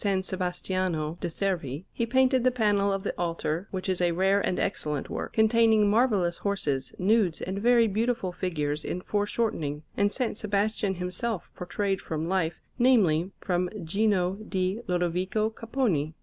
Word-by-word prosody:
Sebastiano 180 -3 -2
de' - - -1
Servi, 170 -5 -2
he 235 - -1
painted 260 +1 +3
the 255 - +5
panel 205 -5 +2
of 195 -1 -2
the - - -2
altar, 170 +1 -2
which 190 0 -4
is 185 -1 0
a 175 -1 +2
rare 195 +3 +3
and 180 - 0
excellent 150 -7 -2
work, - - -4
containing 220 -1 +4
marvellous 205 -6 +2
horses, 150 -10 -1
nudes, 195 -3 +2
and 190 +2 -3
very 235 +1 +5
beautiful 220 -2 0
figures 155 -5 -2
in 180 - -3
foreshortening, 205 -8 -1
and 205 - +3
S. 230 -1 -2
Sebastian 205 -1 0
himself 180 +3 -4
portrayed 195 +2 -2
from 160 0 -3
life 175 -3 0 0.2
namely, 190 -10 +4
from 180 -1 0
Gino 195 +1 +1
di 185 +2 0
Lodovico 180 +4 0
Capponi. 220 - -1
190 Hz, 150 wpm, -27 LUFS, 175-215 Hz, 0.2 s, the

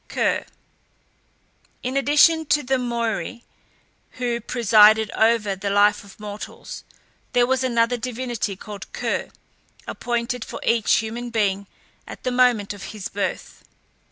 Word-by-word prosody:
KER. - - 0 1.4
In 255 +2 -3
addition 300 +3 +4
to 295 0 +2
the 265 +1 +1
Moiræ, 235 -2 -3 0.7
who 240 -2 -2
presided 215 -2 +5
over 220 -3 +2
the 195 +1 -3
life 205 +1 +3
of 200 0 -16
mortals, 210 0 -8 0.5
there 245 0 +4
was 260 +1 +1
another 240 -1 +2
divinity, 240 -3 -3
called 200 +1 -9
Ker, - - -2 0.6
appointed 240 0 -3
for - - -7
each 230 -2 +2
human 230 +2 -3
being 200 -3 0 0.4
at - - -10
the 255 - -1
moment 245 -5 +3
of 200 - -9
his 195 - -5
birth. 200 0 -4
230 Hz, 130 wpm, -23 LUFS, 210-250 Hz, 1.4 s, presided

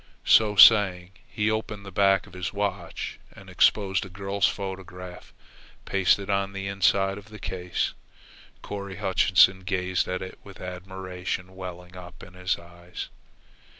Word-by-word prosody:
So 105 -2 +5
saying 95 -4 +7 0.2
he 105 0 0
opened 110 -2 -4
the 100 - -8
back 95 +1 +3
of 100 - -17
his 90 0 -4
watch 100 -2 -4
and - - -13
exposed 95 -3 +3
a 95 - -9
girl's 100 +1 0
photograph 90 -2 -7 0.5
pasted 100 0 +2
on 100 -1 0
the 95 0 -5
inside 100 +1 +1
of 105 +2 -16
the 105 - -10
case. 90 -1 -3 0.7
Corry 100 -1 -6
Hutchinson 95 -1 +4
gazed 95 -1 -1
at 90 0 -3
it 95 - -9
with 100 -1 -13
admiration 90 0 -6
welling 90 -1 -9
up 90 -1 -11
in 90 - -13
his 90 0 -1
eyes. 85 +1 -9
95 Hz, 145 wpm, -26 LUFS, 90-100 Hz, 0.7 s, saying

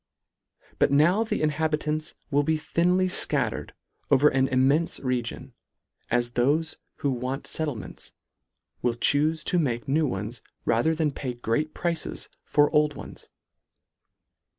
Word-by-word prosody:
But - - +4
now 170 +10 +4
the 220 - -2
inhabitants 155 0 -1 0.2
will 145 +1 +4
be 155 +2 +1
thinly 180 +4 +1
fcattered 185 - 0 0.4
over 150 +3 +5
an 135 0 +2
immenfe 140 +5 +2
region, 125 -2 -3 0.6
as 120 0 +1
thofe 145 +7 +1 0.2
who 140 - -1
want 130 +2 -3
fettlements, 145 - -4 0.7
will 120 -1 +1
chufe 155 +5 +1
to 180 +1 +1
make 120 -7 -1
new 150 +3 +2
ones, 110 +1 -4 0.2
rather 120 +8 +2
than 155 -2 +1
pay 130 -3 -5
great 120 +6 -1
prices 170 -2 -3
for 145 0 +3
old 150 -1 +3
ones. - - -10
145 Hz, 130 wpm, -26 LUFS, 125-160 Hz, 0.7 s, over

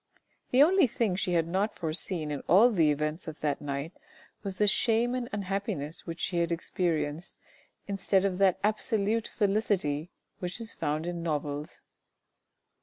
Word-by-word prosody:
The 260 +3 +6
only 360 -1 +5
thing 215 -4 0
she 180 -1 -1
had 165 -1 +2
not 195 +5 0
foreseen 160 -1 -2
in 145 - -3
all 210 +9 +6
the 165 -8 +3
events 150 +3 -1
of 160 -1 -7
that 145 -2 -1
night, 140 +3 -4 0.5
was 195 -2 -4
the 210 - +2
shame 230 +3 +2
and 250 -2 -3
unhappiness 195 -7 -3
which 165 0 -5
she 175 -1 0
had 170 0 0
experienced 165 -2 -2 0.5
instead 195 -1 +1
of 185 -1 -1
that 195 -2 +4
absolute 215 +1 +1
felicity 195 -7 0 0.3
which 180 +2 -3
is 230 -1 -4
found 150 +2 -2
in 175 -1 -3
novels. 150 -2 -3
180 Hz, 155 wpm, -29 LUFS, 155-210 Hz, 0.5 s, The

